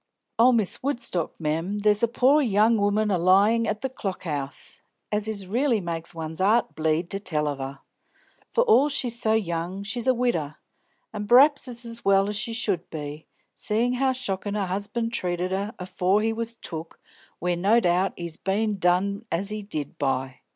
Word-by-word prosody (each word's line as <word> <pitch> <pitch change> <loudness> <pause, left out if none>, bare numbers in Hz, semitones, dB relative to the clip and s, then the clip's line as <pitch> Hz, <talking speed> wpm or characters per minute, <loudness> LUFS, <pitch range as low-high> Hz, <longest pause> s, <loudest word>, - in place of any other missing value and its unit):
"Oh, 245 +2 +7
Miss 220 -6 +1
Woodstock, 235 - -2
mem, 165 +6 -1
there's 210 0 +2
a 235 - +4
poor 260 +6 +4
young 220 -2 +3
'oman 205 +1 +1
a 185 - +1
lyin' 200 +6 +4
at 215 0 -2
the 265 - -1
Clock 195 -8 -5
'Ouse, 140 -4 -4 0.3
as 210 0 0
it 200 -3 -3
really 240 +3 +1
makes 170 -2 -4
one's 160 +1 -5
'art 215 +5 +3
bleed 160 +2 0
to 195 - -1
tell 150 -6 -1
of 145 -2 -3
her! 135 +1 -6 0.7
For 485 - +2
all 435 - +5
she's 245 -4 -1
so 220 - +3
young, 180 -2 -2
she's 230 +4 -3
a 260 - +5
widder, 170 -12 -1 0.6
an' 210 -1 -4
pr'aps 275 +4 +6
it's 240 -1 -6
as 230 0 -4
well 195 +1 +3
she 215 +2 -2
should 205 -7 -1
be, 150 0 -7 0.3
seein' 235 +4 0
how 265 +1 +2
shockin' 210 -5 -3
her 205 -2 0
'usband 230 +3 -3
treated 180 -3 -1
her 200 +4 -2
afore 185 +2 0
he 225 0 +1
was 230 +1 -4
took 165 -6 -7 0.4
where 180 +1 -1
no 200 +7 +3
doubt 180 -1 +1
he's 170 -2 -6
bein' 205 +1 -1
done 195 +4 +1
as 190 +4 -1
he 215 0 -4
did 155 -8 -6
by. 130 -2 -1
200 Hz, 185 wpm, -25 LUFS, 175-230 Hz, 0.7 s, Oh